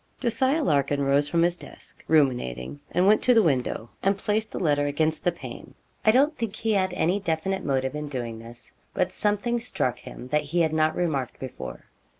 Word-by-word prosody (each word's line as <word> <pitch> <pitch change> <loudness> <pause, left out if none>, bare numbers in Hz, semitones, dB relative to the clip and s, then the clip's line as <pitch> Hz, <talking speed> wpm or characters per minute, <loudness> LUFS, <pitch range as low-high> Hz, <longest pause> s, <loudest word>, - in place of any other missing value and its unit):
Jos. 235 0 -2
Larkin 145 - +2
rose 140 +1 +2
from 170 +2 +2
his 175 0 +1
desk, - - -13
ruminating, 125 - +1
and 180 +2 +2
went 210 +2 +5
to 250 - +4
the 225 - +6
window, 125 -6 -1
and 195 +1 +2
placed 215 +2 -1
the - - -5
letter 145 -4 +1
against 155 +2 0
the 175 - +3
pane. 170 - -10 0.3
I - - +4
don't 280 +7 +4
think 225 -5 -4
he 225 0 -1
had 190 -2 +1
any 180 +5 +1
definite 190 +1 -2
motive 130 -1 0
in 150 0 -5
doing 120 -5 -4
this, 115 +1 -12 0.2
but 180 - +1
something 210 +4 0
struck 130 - -1
him 125 - -10
that 150 +2 +2
he 170 +4 0
had 160 -1 +1
not 155 0 +2
remarked 145 -8 -2
before. 115 - -7
160 Hz, 195 wpm, -26 LUFS, 140-200 Hz, 0.3 s, the